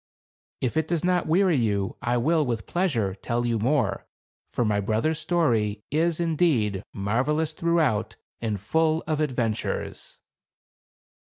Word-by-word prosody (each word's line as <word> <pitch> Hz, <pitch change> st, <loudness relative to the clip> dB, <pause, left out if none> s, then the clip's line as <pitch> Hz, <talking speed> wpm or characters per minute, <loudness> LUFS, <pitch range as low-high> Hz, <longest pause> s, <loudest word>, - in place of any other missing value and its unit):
" -, -, -67 dB
If 130 Hz, +4 st, -1 dB
it 160 Hz, -1 st, +1 dB
does 170 Hz, -1 st, -1 dB
not 180 Hz, -1 st, +1 dB
weary 175 Hz, 0 st, +3 dB
you, 100 Hz, -5 st, 0 dB
I 120 Hz, +1 st, +1 dB
will, 155 Hz, +6 st, +2 dB
with 115 Hz, -5 st, -2 dB
pleasure, 130 Hz, -, 0 dB
tell 120 Hz, +5 st, -2 dB
you 115 Hz, -2 st, 0 dB
more; 115 Hz, -5 st, 0 dB, 0.4 s
for 120 Hz, -, 0 dB
my 105 Hz, -1 st, +1 dB
brother's 110 Hz, +10 st, 0 dB
story 110 Hz, -12 st, +1 dB
is, 165 Hz, +2 st, +1 dB
indeed, 150 Hz, -, +1 dB
marvelous 135 Hz, +10 st, 0 dB
throughout, 160 Hz, -9 st, +1 dB, 0.3 s
and 110 Hz, -3 st, -2 dB
full 160 Hz, -, +1 dB
of 155 Hz, -2 st, -1 dB
adventures." 125 Hz, -7 st, -2 dB
130 Hz, 140 wpm, -25 LUFS, 110-160 Hz, 0.4 s, weary